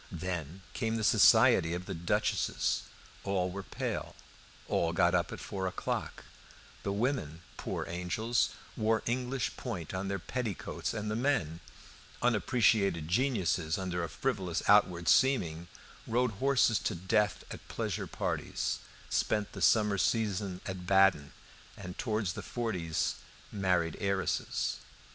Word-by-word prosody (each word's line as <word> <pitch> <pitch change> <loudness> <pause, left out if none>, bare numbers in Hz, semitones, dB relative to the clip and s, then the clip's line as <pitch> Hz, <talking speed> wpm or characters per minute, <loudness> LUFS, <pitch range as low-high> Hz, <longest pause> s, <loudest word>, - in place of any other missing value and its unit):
Then 90 0 -4
came 115 0 -1
the 110 - -2
society 85 -4 +6
of 90 +1 -5
the 95 - -4
duchesses; 85 0 0 0.4
all 95 -2 0
were 100 +2 -5
pale; - - -4 0.5
all 85 0 +1
got 85 0 +3
up 85 -2 +1
at - - -6
four 95 -1 -3
o'clock; 90 - -3 0.6
the 100 - -2
women, 100 - -1
poor - - -4
angels, 90 +7 0 0.3
wore 110 0 +1
English 125 +2 -1
point 95 - -5
on 95 +1 -2
their 100 0 -1
petticoats; 110 +2 -4
and 105 0 -3
the - - -1
men, 110 - 0 0.6
unappreciated 105 -7 +2
geniuses 90 - +1
under 90 -2 -2
a 85 - -3
frivolous 95 - -2
outward 90 -4 +4
seeming, 85 -12 +3 0.4
rode 120 +1 +1
horses 120 0 +3
to - - -2
death 100 +3 +1
at - - -9
pleasure - - -3
parties, - - -2 0.3
spent 105 -2 0
the - - -8
summer 105 -3 +4
season 100 -5 0
at 95 -2 -6
Baden, 95 -7 +4 0.5
and 90 0 -7
towards 110 -6 -1
the - - -6
forties 90 -9 -2 0.3
married 90 -4 +1
heiresses. 100 -2 -1
95 Hz, 130 wpm, -31 LUFS, 85-110 Hz, 0.6 s, society